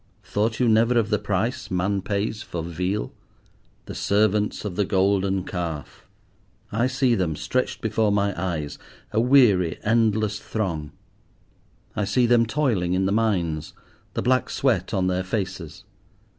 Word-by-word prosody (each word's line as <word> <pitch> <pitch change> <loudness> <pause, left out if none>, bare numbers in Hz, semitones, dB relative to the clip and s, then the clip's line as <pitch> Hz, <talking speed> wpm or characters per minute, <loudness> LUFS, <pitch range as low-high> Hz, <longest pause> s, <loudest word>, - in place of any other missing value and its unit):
Thought 110 +2 -1
you 125 - +3
never 115 +2 +4
of 115 -1 +1
the 105 - +2
price 105 +5 -2
man 95 +2 0
pays 105 +2 -2
for 85 -2 -5
Veal? 90 +5 -2 0.7
The - - -7
servants 105 +1 +1
of 95 -4 -4
the 105 - +2
Golden 95 -1 +1
Calf! 85 -6 -5 0.6
I 115 +4 +1
see 130 -1 +2
them, 90 -8 0
stretched 130 +11 -2
before 110 -1 +1
my 100 0 +1
eyes, 80 -5 -3 0.3
a 110 - +2
weary, 115 -10 +4
endless 110 -2 +2
throng. 85 -9 -3 1.0
I 105 - 0
see 110 +5 +2
them 120 -1 +4
toiling 115 -10 0
in 95 +1 +1
the 95 - +1
mines, 90 -8 0 0.4
the - - -1
black 130 +1 +2
sweat 115 -10 0
on 95 -3 +1
their 90 0 0
faces. 95 -4 -4
100 Hz, 145 wpm, -24 LUFS, 90-115 Hz, 1.0 s, never